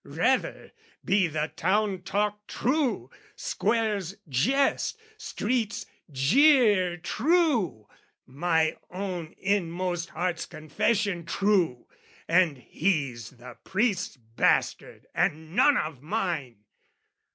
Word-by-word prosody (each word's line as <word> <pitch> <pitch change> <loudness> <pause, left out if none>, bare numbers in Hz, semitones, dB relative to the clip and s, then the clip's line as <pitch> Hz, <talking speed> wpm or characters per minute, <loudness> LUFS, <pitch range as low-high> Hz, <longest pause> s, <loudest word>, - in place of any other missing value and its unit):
Rather - - -1 0.3
be 195 -2 +3
the 155 0 -2
town 190 +3 +1
talk 210 +3 -2
true, 270 +1 -1 0.2
Square's 210 -5 -1
jest, 270 - +1 0.2
street's 230 -4 -2 0.3
jeer 205 - +4
True, 240 - +1 0.4
my 160 +3 0
own 180 -3 -5
inmost 180 -3 -1
heart's 175 0 -2
confession 180 +4 -1
true, 180 - +1 0.4
And 170 -4 +3
he's 130 - -2
the 125 -1 -13
priest's 190 - -1
bastard 115 -1 0
and 160 +3 -1
none 290 - +5
of 155 -4 -3
mine! 155 - -3
180 Hz, 90 wpm, -27 LUFS, 155-210 Hz, 0.4 s, none